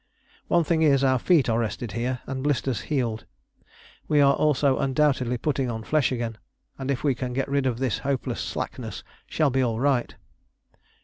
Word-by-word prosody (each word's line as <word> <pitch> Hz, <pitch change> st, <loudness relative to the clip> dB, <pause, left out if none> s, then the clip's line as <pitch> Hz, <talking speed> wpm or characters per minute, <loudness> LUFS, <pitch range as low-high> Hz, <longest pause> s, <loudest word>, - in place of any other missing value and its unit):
One 170 Hz, -, +3 dB
thing 160 Hz, +1 st, +1 dB
is, 140 Hz, -3 st, +4 dB
our 130 Hz, -1 st, +3 dB
feet 160 Hz, -1 st, +3 dB
are 115 Hz, -1 st, +1 dB
rested 110 Hz, 0 st, -3 dB
here, 120 Hz, +3 st, -2 dB
and 135 Hz, -1 st, -4 dB
blisters 135 Hz, -5 st, 0 dB
healed. 120 Hz, -7 st, -1 dB, 0.8 s
We 150 Hz, -, +3 dB
are 140 Hz, -1 st, +6 dB
also 145 Hz, -3 st, +2 dB
undoubtedly 130 Hz, -3 st, +1 dB
putting 135 Hz, 0 st, -1 dB
on 110 Hz, -1 st, -4 dB
flesh 150 Hz, +1 st, +1 dB
again, 115 Hz, -3 st, -3 dB, 0.4 s
and 135 Hz, 0 st, -4 dB
if 135 Hz, -3 st, -1 dB
we 140 Hz, -3 st, +3 dB
can 125 Hz, 0 st, -4 dB
get 135 Hz, +2 st, -1 dB
rid 140 Hz, -1 st, 0 dB
of 120 Hz, -3 st, -1 dB
this 130 Hz, -3 st, -1 dB
hopeless 140 Hz, -1 st, -2 dB
slackness -, -, -5 dB, 0.2 s
shall 155 Hz, -3 st, +1 dB
be 130 Hz, +1 st, +1 dB
all 115 Hz, -3 st, 0 dB
right.... 135 Hz, -2 st, +1 dB
130 Hz, 180 wpm, -25 LUFS, 120-140 Hz, 0.8 s, are